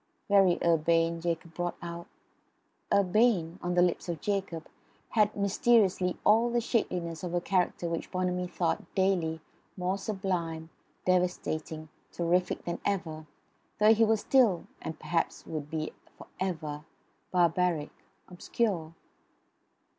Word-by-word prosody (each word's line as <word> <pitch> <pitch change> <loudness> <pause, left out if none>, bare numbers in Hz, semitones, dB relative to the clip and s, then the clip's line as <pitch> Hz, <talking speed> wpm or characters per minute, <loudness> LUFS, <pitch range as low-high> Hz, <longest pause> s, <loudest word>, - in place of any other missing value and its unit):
"Very 195 -3 +5
urbane," 165 0 +2
Jacob 170 0 -3
brought 175 0 -3
out. 170 0 -7 0.8
"Urbane" 195 -3 +3
on 175 0 -1
the 175 - +5
lips 180 0 0
of 170 -3 -3
Jacob 195 -4 -2 0.4
had 210 -2 +2
mysteriously 200 -2 +2
all 230 +3 +5
the 240 0 +1
shapeliness 180 -8 -1
of 175 -1 -3
a - - +3
character 180 -1 0
which 165 -1 -3
Bonamy 180 0 -1
thought 175 -2 -2
daily 175 -5 +1 0.4
more 185 +2 -1
sublime, 175 -6 -3 0.3
devastating, 160 -4 -1 0.2
terrific 175 +1 0
than 170 - -3
ever, 160 -6 -2 0.5
though 215 +1 +6
he 225 +1 +3
was 220 -1 +3
still, 235 -10 +3 0.2
and 160 - -5
perhaps 170 -1 -2
would 150 -2 -5
be 155 0 -3 0.2
for - - -11
ever, 155 -5 -3 0.5
barbaric, 175 -3 +2 0.4
obscure. 180 -3 -2
175 Hz, 125 wpm, -29 LUFS, 165-195 Hz, 0.8 s, though